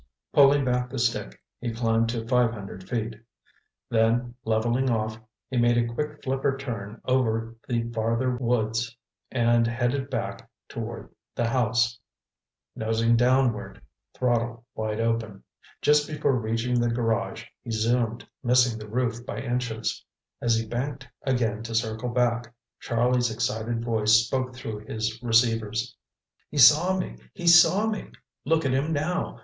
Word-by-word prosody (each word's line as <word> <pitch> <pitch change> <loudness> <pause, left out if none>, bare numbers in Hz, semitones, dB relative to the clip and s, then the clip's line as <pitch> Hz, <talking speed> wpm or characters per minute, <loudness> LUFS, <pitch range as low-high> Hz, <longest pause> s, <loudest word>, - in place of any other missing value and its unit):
Pulling 140 0 +6
back 125 0 0
the 135 - -6
stick, 115 - -1 0.2
he 120 -1 -3
climbed 115 0 +1
to 115 -1 -3
five 125 -2 +3
hundred 95 -3 -9
feet. 115 -1 -2 0.7
Then, 115 +2 +1
leveling 120 +4 +1
off, 110 -1 -1 0.3
he 130 - -3
made 120 0 +4
a 120 0 0
quick 150 +3 -4
flipper 135 +1 0
turn 115 -5 -6
over 115 -3 0
the 120 -2 0
farther 115 +3 0
woods 115 -1 -1 0.3
and 120 -2 +3
headed 120 +3 -1
back - - -4 0.2
toward - - -6 0.3
the 120 - 0
house, 120 0 +1 0.8
nosing 115 +1 +2
downward, 125 -1 +2 0.4
throttle 120 -2 0
wide 110 0 -3
open. 115 -3 -1 0.4
Just 150 0 +4
before 150 -2 0
reaching 115 +1 0
the 120 0 +2
garage, 115 -1 -1 0.2
he 120 - -9
zoomed, 115 +1 0
missing 125 -2 +3
the 105 0 -9
roof 120 0 -1
by - - -6
inches. 120 -3 -2 0.4
As 120 -1 +2
he 115 0 -1
banked 130 +4 -4 0.2
again 115 -5 0
to 115 0 -5
circle 110 +1 -1
back, 120 -1 0 0.3
Charlie's 120 +1 +1
excited 115 +1 -2
voice 110 -2 +2
spoke 130 +1 -2
through 110 -4 -6
his 110 +1 -3
receivers. 115 -1 +1 0.5
"He 150 - -7
saw 155 +8 +7
me—he 180 0 -7
saw 170 +5 +7
me! 215 -2 -3 0.4
Look 160 0 +2
at 130 - +1
him 145 +5 0
now! 160 +4 -2
120 Hz, 140 wpm, -26 LUFS, 115-125 Hz, 0.8 s, saw